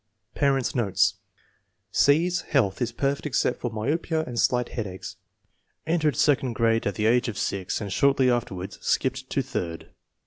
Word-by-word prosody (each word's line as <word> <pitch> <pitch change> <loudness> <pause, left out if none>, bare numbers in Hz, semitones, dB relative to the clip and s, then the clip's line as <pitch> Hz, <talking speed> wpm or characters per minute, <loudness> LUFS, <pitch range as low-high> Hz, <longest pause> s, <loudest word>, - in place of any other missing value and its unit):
Parents 135 -3 +1
9 120 - +1
notes. 100 +1 +2 0.8
C/s 170 +5 +3
health 110 -9 +1
is 120 -1 0
perfect 140 +4 -1
except 135 - 0
for 120 - -2
myopia 155 +8 -1
and 120 -2 -4
slight 125 -1 +2
headaches. 95 -5 -6 0.7
Entered 155 -3 +1
second 135 -4 +2
grade 115 -1 +1
at 100 - -2
the 105 - -1
age 120 +2 +3
of 110 -4 -4
6 95 -2 -2
and 100 -3 -4
shortly 140 -2 +3
afterwards 100 -7 -2
skipped - - -1
to - - 0
third.' 85 -2 -5
120 Hz, 160 wpm, -25 LUFS, 105-140 Hz, 0.8 s, C/s